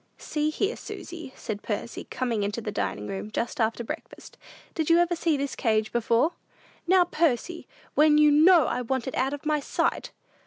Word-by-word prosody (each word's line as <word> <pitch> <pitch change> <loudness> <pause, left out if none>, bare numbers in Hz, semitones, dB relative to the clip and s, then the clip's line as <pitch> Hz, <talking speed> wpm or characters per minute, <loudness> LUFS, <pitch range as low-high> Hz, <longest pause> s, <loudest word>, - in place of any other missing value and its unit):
"See 300 0 -1
here, 400 +8 -1
Susy," 330 -6 -8
said 210 -2 -5
Percy, 215 +2 -4
coming 240 -5 -2
into 205 +3 -2
the 215 -2 -4
dining 100 - -3
room, 195 - -5
just 230 +4 -3
after 225 +2 0
breakfast; 300 +7 -8 0.4
"did 320 -2 -1
you 335 - +6
ever 345 0 +2
see 330 -3 +1
this 280 0 -3
cage 220 -2 +1
before?" 235 +6 +2 0.6
"Now, 370 0 +6
Percy! 335 0 -1 0.3
When 300 0 +5
you 300 0 +6
know 320 +1 +6
I 250 - -1
want 255 0 -2
it 260 - -3
out 265 +2 0
of 290 - -14
my 300 0 +1
sight!" - - -1
275 Hz, 185 wpm, -26 LUFS, 230-320 Hz, 0.6 s, you